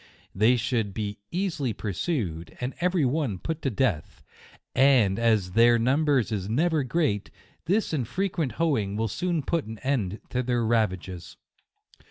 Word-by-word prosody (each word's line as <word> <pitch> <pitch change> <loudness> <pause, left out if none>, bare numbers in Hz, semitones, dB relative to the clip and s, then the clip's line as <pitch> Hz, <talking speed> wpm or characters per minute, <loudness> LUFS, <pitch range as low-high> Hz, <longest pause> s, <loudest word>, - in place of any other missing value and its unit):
They 110 +6 +4
suould 110 -4 -1
be 105 -2 -4
early 165 - -1
pursued, 100 - -3
and 125 +2 -3
every 180 -4 +2
one 130 -6 0
put 160 - -4
to 135 - 0
death; 105 - -1 0.5
and 125 -8 +4
as 110 -6 +2
their 120 +3 +5
number 140 +5 +2
is 105 -5 -1
never 155 +5 +2
great, 130 -6 0 0.4
this 200 +1 +1
and 130 -7 -1
frequent 175 - -1
hoeing 115 -12 0
will 110 +1 0
soon 170 - -1
put 165 +2 -1
an 110 +1 -7
end 110 -8 -1
to 125 - 0
their 120 -2 0
ravages. 95 -6 -1
120 Hz, 150 wpm, -26 LUFS, 105-150 Hz, 0.5 s, their